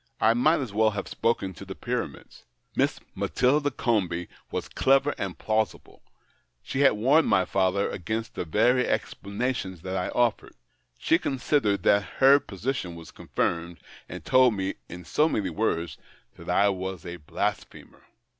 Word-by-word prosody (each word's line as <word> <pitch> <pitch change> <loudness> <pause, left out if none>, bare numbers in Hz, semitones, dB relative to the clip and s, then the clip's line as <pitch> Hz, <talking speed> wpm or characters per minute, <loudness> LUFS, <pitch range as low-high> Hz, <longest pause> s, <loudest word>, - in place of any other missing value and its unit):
I 110 - +4
might 150 +8 +3
as 120 -6 -5
well 110 +1 +4
have 105 -1 -5
spoken 105 -5 -1
to - - -11
the - - -8
Pyramids. - - -5 0.3
Miss - - +1
Matilda 145 +3 +1
Comby 90 -10 -1 0.2
was - - -4
clever 135 +2 +2
and 95 -3 -4
plausible; 110 0 -2 0.6
she 135 - -4
had 140 -1 +6
warned 135 +9 +3
my 95 - +3
father 95 +1 +1
against 110 +5 -4
the - - -3
very 120 +9 +2
explanations 100 -4 -3
that 95 0 -4
I 90 -1 -1
offered. 120 -3 0 0.4
He 165 - +2
considered 125 - 0
that 100 0 +4 0.2
her 135 +2 +7
position 110 -5 -4
was 85 -1 -11
confirmed, 85 0 -2 0.3
and - - -8
told 130 -3 +5
me, 95 0 -2 0.2
in 90 0 -9
so 155 - +2
many 95 - -1
words, 85 -4 -2 0.4
that - - -11
I 100 +1 +4
was 95 -2 -4
a 85 0 -6
blasphemer." 75 -3 -5
105 Hz, 155 wpm, -26 LUFS, 95-125 Hz, 0.6 s, her